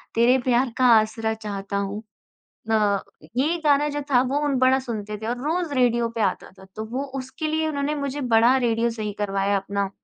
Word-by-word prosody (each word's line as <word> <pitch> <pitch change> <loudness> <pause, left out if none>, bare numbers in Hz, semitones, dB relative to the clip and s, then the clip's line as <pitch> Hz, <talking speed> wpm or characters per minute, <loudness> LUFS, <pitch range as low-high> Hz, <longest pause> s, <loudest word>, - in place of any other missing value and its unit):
तेरे 240 +3 +5
प्यार 245 0 +2
का 255 - +3
आसरा 220 +1 -2
चाहता 200 -2 -5
हूँ। 200 +2 -3 0.7
अ, 210 -2 +2 0.4
ये 305 +7 +2
गाना 290 0 +4
जो 290 0 -3
था 245 -2 +5
वो 280 +2 +1
उन 285 -2 +1
बड़ा 260 +1 +4
सुनते 215 -5 -5
थे - - -5
और 240 +2 -2
रोज़ 330 0 -1
रेडियो 240 -2 +2
पे 230 - -1
आता 195 -3 -1
था। 190 - -13
तो 215 - -4
वो 260 +3 -2 0.2
उसके 265 +4 -5
लिए 315 +1 0
उन्होंने 290 0 -1
मुझे 280 0 -3
बड़ा 235 +3 +5
रेडियो 235 -2 +1
सही 215 -2 -4
करवाया 200 0 0
अपना। 200 0 -2
235 Hz, 195 wpm, -23 LUFS, 210-275 Hz, 0.7 s, तेरे